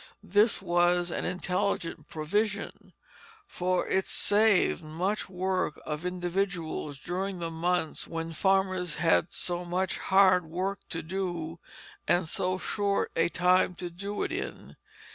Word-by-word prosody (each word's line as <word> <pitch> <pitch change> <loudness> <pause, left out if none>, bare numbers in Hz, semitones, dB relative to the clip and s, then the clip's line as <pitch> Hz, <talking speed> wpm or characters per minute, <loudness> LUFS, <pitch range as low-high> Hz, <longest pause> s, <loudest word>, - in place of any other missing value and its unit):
This 205 +1 +3
was 175 0 +2
an - - -2
intelligent 180 -1 -1
provision; 200 +7 -2 0.5
for 180 - -1
it 190 - +1
saved 205 -4 +3
much 180 +8 -2
work 185 -3 -1
of 150 +3 -3
individuals 175 -4 -2
during 185 +5 -3
the 165 -1 -4
months 165 0 -1
when 165 0 -4
farmers 185 -2 +1
had 165 0 +3
so 175 0 -2
much 180 +1 -1
hard 190 -2 +5
work 190 +4 -2
to 165 -1 -3
do, 170 -2 -3 0.5
and 175 -1 +2
so 185 +3 0
short 200 +1 0
a 165 +1 +3
time 180 +1 +3
to 175 0 -6
do 200 +4 -4
it - - -2
in. - - -5
180 Hz, 130 wpm, -29 LUFS, 170-190 Hz, 0.5 s, hard